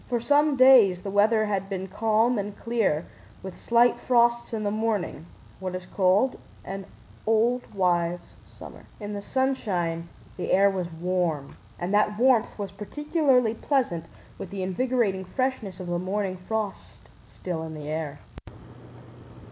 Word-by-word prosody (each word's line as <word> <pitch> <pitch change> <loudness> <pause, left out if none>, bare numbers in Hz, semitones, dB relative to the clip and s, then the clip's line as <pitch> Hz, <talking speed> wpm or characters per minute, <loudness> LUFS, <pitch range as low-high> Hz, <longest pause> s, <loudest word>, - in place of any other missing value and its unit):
For 240 -1 +1
some 290 +4 +3
days 240 -9 +6
the 195 - -4
weather 215 +2 +3
had 195 -2 -2
been 190 -1 -4
calm 220 +3 +1
and 205 0 -5
clear 225 -10 0 0.4
with 190 -1 -7
slight 235 +1 +3
frosts 235 -1 +2
in 220 -2 -3
the 205 - 0
mornings—what 190 -4 -4
is 185 0 -6
called 195 +8 +2 0.3
an 195 0 -6 0.4
"old 230 +3 +1
wives' 175 -2 0
summer." - - -13
In 210 -1 -5
the 200 - -4
sunshine 185 -10 -1 0.3
the 185 - -3
air 200 +1 +5
was 180 -3 -3
warm, 165 -4 -2 0.2
and 175 +3 -3
that 210 0 +2
warmth 245 -1 +3
was 200 -3 -5
particularly 260 - +1
pleasant 230 - -1 0.3
with 195 - -6
the 195 -1 -4
invigorating 200 0 0
freshness 220 -2 -3
of 185 - -6
the 175 0 -2
morning 190 0 -2
frost 220 -2 -4 0.2
still 175 -3 -5
in 160 -1 -6
the 150 -1 -8
air. 155 -2 -3
205 Hz, 145 wpm, -26 LUFS, 185-235 Hz, 0.4 s, days